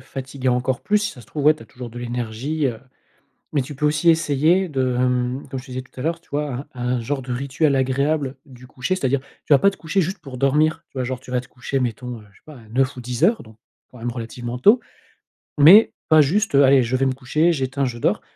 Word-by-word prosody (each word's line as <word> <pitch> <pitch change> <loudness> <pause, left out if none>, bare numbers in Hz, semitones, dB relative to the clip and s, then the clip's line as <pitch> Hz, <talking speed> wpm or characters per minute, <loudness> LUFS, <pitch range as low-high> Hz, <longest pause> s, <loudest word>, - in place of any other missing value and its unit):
fatiguer 130 0 -5
encore 125 +1 0
plus, 210 0 +2
si 205 - -2
ça 125 - -13
se 115 - -16
trouve. 145 -2 -5
Ouais, 155 +1 +6
tu 155 - -14
as - - -15
toujours 120 +1 -9
de 120 - -9
l'énergie, 120 +5 -3
heu, 115 -3 -3 0.8
mais 140 - +2
tu 140 +3 -7
peux 150 +2 -1
aussi 150 +3 +3
essayer 165 +3 +3
de, 130 -3 0
hem, 125 +2 0
comme 130 - -4
je 125 - -12
te 130 - -12
disais 130 0 -4
tout 130 - -26
à - - -4
l'heure, 165 +1 -1
tu 170 - -31
vois, 145 -2 -3
un 125 -1 -6
un - - -3
genre 135 +3 -3
de 125 0 -7
rituel 140 +3 0
agréable 135 +1 0
du 125 -3 -14
coucher. 130 +8 -2
C'est-à-dire, 140 -6 0
tu 140 +2 -2
vas 135 - +6
pas 200 - +5
te 195 - -11
coucher 165 +4 0
juste 190 +4 -2
pour 135 -5 -9
dormir, 150 +3 +2
tu - - -12
vois? 130 - 0
Genre, 130 0 -4
tu 125 - -15
vas 125 -1 0
te 125 - -17
coucher, 130 +2 -3
mettons, 125 0 -4
heu, - - -17
je - - -23
sais - - -43
pas, 155 -3 -12
à 110 -3 -16
21:00 130 +4 0
ou - - -6
22:00 125 +4 -4
heures, 220 +5 +3
donc, 110 -1 -17 0.3
quand 125 - -14
même 120 +1 -3
relativement 120 +1 -6
tôt, 210 - +5 0.8
mais 175 +10 +8 0.2
pas 155 -1 +7
juste, 195 +7 +1
heu: 140 - +7
«Allez, 135 -1 +5
je 120 +2 -1
vais 135 +1 +1
me 130 - 0
coucher, 150 +6 +1
j'éteins, 135 -1 -1
je 120 -2 -4
dors». - - 0
135 Hz, 265 wpm, -21 LUFS, 125-150 Hz, 0.8 s, mais